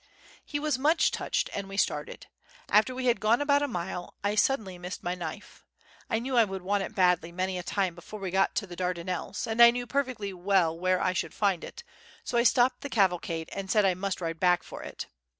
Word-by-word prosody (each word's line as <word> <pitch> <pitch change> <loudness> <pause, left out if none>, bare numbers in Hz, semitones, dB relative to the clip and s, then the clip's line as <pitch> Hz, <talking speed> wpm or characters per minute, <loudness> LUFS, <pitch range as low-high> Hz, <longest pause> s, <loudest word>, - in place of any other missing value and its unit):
He 290 - -3
was 300 -3 0
much 310 +5 +3
touched, - - -1
and 200 -1 -4
we 195 - -7
started. - - -1 0.4
After 215 +5 +3
we 255 0 -3
had 240 -4 +3
gone 220 +4 +3
about 285 0 +3
a 290 - +1
mile, 180 -5 -5
I 205 0 +1
suddenly 210 -5 +1
missed 180 +1 -7
my 175 - -1
knife. 175 +2 -8 0.5
I 225 - +1
knew 255 +3 -3
I 230 -3 +5
should 190 -1 -6
want 200 +2 +1
it 205 - -5
badly 180 -3 +2
many 185 +1 -2
a - - -3
time 185 0 -1
before 175 +5 -10
we 190 -2 -4
got 195 +1 +2
to 210 - 0
the 175 -2 -10
Dardanelles, 180 0 -3
and 225 +1 +1
I 235 - +11
knew 245 +1 -2
perfectly 245 -6 -2
well 180 -3 +2
where 185 +2 +1
I 185 0 +1
should - - -3
find 195 -5 +1
it: 475 - -9 0.4
so - - -4
I 235 - +5
stopped 245 +1 +3
the 285 - -5
cavalcade 175 -7 0
and 195 -1 -5
said 210 -1 +4
I 190 - +4
must 185 +1 -3
ride 165 -1 -3
back 180 0 +3
for - - -9
it. - - -7
195 Hz, 225 wpm, -28 LUFS, 180-235 Hz, 0.5 s, I